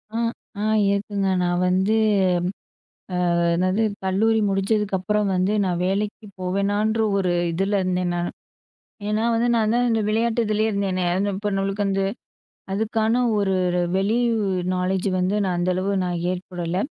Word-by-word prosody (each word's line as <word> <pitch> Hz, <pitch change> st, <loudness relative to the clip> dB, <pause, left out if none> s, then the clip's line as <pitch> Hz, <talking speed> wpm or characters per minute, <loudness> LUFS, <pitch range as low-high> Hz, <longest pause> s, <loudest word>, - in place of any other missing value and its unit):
அ, -, -, 0 dB, 0.4 s
அ -, -, -1 dB, 0.3 s
இருக்குங்க. 200 Hz, -1 st, -1 dB
நான் 175 Hz, 0 st, +1 dB
வந்து, 190 Hz, +4 st, +2 dB, 1.4 s
அ, -, -, +2 dB
என்னது, 185 Hz, +5 st, +1 dB, 0.2 s
கல்லூரி 215 Hz, +4 st, +2 dB
முடிஞ்சதுக்கப்பறம் 195 Hz, 0 st, 0 dB
வந்து, 185 Hz, +3 st, +1 dB
நான் 180 Hz, -2 st, -1 dB
வேலைக்கு 210 Hz, +3 st, -2 dB
போவேனான்ற 205 Hz, +4 st, 0 dB, 0.2 s
ஒரு 185 Hz, -3 st, +1 dB, 0.2 s
இதுல 195 Hz, +4 st, 0 dB
இருந்தேன் 180 Hz, -1 st, 0 dB
நானு. 175 Hz, 0 st, -2 dB, 0.8 s
ஏன்னா, 215 Hz, +1 st, 0 dB
வந்து 235 Hz, +2 st, +1 dB
நான் 220 Hz, -1 st, +2 dB
தான் 245 Hz, 0 st, +2 dB
இந்த 225 Hz, -1 st, +2 dB
விளையாட்டு 225 Hz, +2 st, +1 dB
இதுலேயே 215 Hz, +1 st, +1 dB
இருந்தேனே, 190 Hz, -2 st, -1 dB
அது 200 Hz, +2 st, 0 dB
இப்ப 205 Hz, +1 st, -2 dB
நம்மளுக்கு 195 Hz, +1 st, -1 dB
வந்து, 195 Hz, 0 st, 0 dB, 0.7 s
அதுக்கான 220 Hz, +3 st, +1 dB, 0.2 s
ஒரு 195 Hz, -2 st, +1 dB, 0.4 s
வெளி, 205 Hz, +4 st, +1 dB, 0.2 s
உ -, -, 0 dB, 0.3 s
நாலேட்ஜ் 185 Hz, +2 st, 0 dB
வந்து, 185 Hz, +3 st, +1 dB
நான் 180 Hz, -2 st, -1 dB
அந்த 180 Hz, +1 st, +1 dB
அளவு 190 Hz, +2 st, -1 dB
நான் 175 Hz, -1 st, -2 dB
ஏற்படல. 180 Hz, -1 st, -4 dB
195 Hz, 140 wpm, -23 LUFS, 185-215 Hz, 1.4 s, வந்து